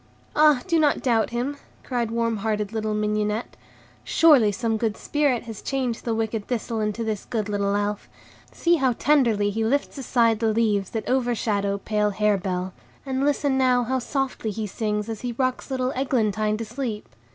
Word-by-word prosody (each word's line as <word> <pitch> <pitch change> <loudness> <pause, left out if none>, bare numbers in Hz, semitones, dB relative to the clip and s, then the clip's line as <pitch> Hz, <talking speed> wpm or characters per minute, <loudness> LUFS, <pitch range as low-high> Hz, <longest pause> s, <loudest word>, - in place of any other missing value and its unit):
"Ah, 300 -4 +5
do 335 -3 +2
not 300 -2 +2
doubt 230 -4 +2
him!" 250 +5 -2 0.3
cried 240 -3 -1
warm 230 -1 0
hearted 210 0 -2
little 215 -1 -1
Mignonette; 210 +1 -1 0.5
"surely 280 -10 +5
some 225 +2 -1
good 220 -1 -1
spirit 285 -5 0
has 225 -3 -8
changed 255 -4 -2
the 230 -2 0
wicked 220 -1 -2
Thistle 230 -2 -2
into 215 +1 -1
this 215 -3 -3
good 215 -3 -2
little 200 -1 0
Elf. 205 0 -2 0.4
See 345 0 +2
how 265 -4 +2
tenderly 230 -7 +2
he 220 +2 -1
lifts 280 +4 0
aside 230 -4 +2
the 225 -1 +2
leaves 215 -3 +1
that 225 - -4
overshadow 220 -6 0
pale 210 +1 0
Harebell, 195 -3 0 0.3
and 265 0 -1
listen 285 -1 +1
now 250 -1 +3
how 260 +2 0
softly 265 -3 -2
he 215 +1 -3
sings 210 0 -2
as 225 -2 -5
he 245 -1 -3
rocks 255 +3 -1
little 260 -1 -1
Eglantine 215 -5 0
to 225 - -4
sleep. 230 -2 -4
225 Hz, 175 wpm, -24 LUFS, 210-255 Hz, 0.5 s, Ah